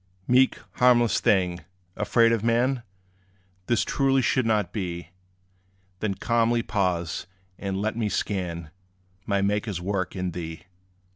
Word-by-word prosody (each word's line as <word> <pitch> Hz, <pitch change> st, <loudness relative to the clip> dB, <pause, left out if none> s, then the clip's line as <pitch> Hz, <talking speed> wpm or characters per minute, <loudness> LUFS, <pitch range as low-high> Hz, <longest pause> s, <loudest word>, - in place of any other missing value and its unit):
Meek, 130 Hz, +1 st, +4 dB, 0.2 s
harmless 120 Hz, -2 st, +4 dB
thing, 90 Hz, -3 st, +2 dB, 0.4 s
afraid 115 Hz, +2 st, +3 dB
of 115 Hz, -2 st, 0 dB
man? 120 Hz, +3 st, +2 dB, 0.9 s
This 120 Hz, -2 st, +2 dB
truly 135 Hz, -1 st, +2 dB
should 130 Hz, -1 st, +2 dB
not 105 Hz, -5 st, +1 dB
be. 85 Hz, -5 st, -4 dB, 0.9 s
Then 100 Hz, -1 st, -1 dB
calmly 115 Hz, +1 st, +1 dB
pause, 90 Hz, -8 st, -1 dB, 0.3 s
and 95 Hz, -1 st, -3 dB
let 110 Hz, +2 st, -1 dB
me 110 Hz, -2 st, -1 dB
scan 85 Hz, -6 st, -3 dB, 0.6 s
My 100 Hz, -1 st, +1 dB
Maker's 105 Hz, -1 st, -1 dB
work 95 Hz, +1 st, -2 dB
in 90 Hz, -1 st, -2 dB
thee. 80 Hz, -1 st, -6 dB
105 Hz, 125 wpm, -26 LUFS, 90-115 Hz, 0.9 s, Meek